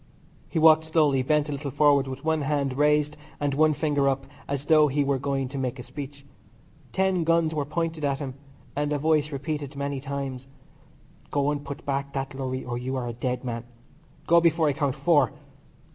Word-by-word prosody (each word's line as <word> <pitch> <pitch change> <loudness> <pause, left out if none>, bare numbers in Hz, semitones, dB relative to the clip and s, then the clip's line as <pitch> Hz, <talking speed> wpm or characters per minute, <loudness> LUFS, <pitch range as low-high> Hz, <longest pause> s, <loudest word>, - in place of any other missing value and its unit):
He - - -3
walked 160 0 +6
slowly, 150 -4 +3
bent 150 +3 +2
a - - -4
little 140 0 -4
forward, 140 0 +4
with 130 +3 -7
one 160 -1 +1
hand 140 -2 0
raised 150 +1 +2 0.2
and 145 -1 0
one 155 +2 +4
finger 145 -3 +1
up 135 0 -2 0.2
as 140 0 -3
though 155 0 +6
he 145 +1 +1
were 140 -1 0
going 135 -1 -1
to 140 0 -5
make 130 0 -2
a 125 - -7
speech. 140 0 -8 0.7
Ten 190 -2 +1
guns 165 -1 +2
were 150 -2 -1
pointing 160 +1 -2
at 140 -1 +1
him, 135 -2 -5 0.4
and 145 0 -1
a 150 - +1
voice 155 0 +2
repeated 145 0 -4
many 140 -1 -3
times: 135 -2 -5 0.8
"Go 145 0 +1
and 145 -1 -3
put 140 +3 -8
back 140 0 -2
that 135 0 -3
lorry 130 -1 -4
or 120 -1 -3
you 130 +2 -3
are 125 -2 -2
a 120 - -4
dead 125 +2 -3
man. 115 -2 -4 0.6
Go 170 0 +5
before 165 -1 +3
I - - +1
count 140 -1 -1
four. 145 - +3
140 Hz, 200 wpm, -26 LUFS, 135-150 Hz, 0.8 s, walked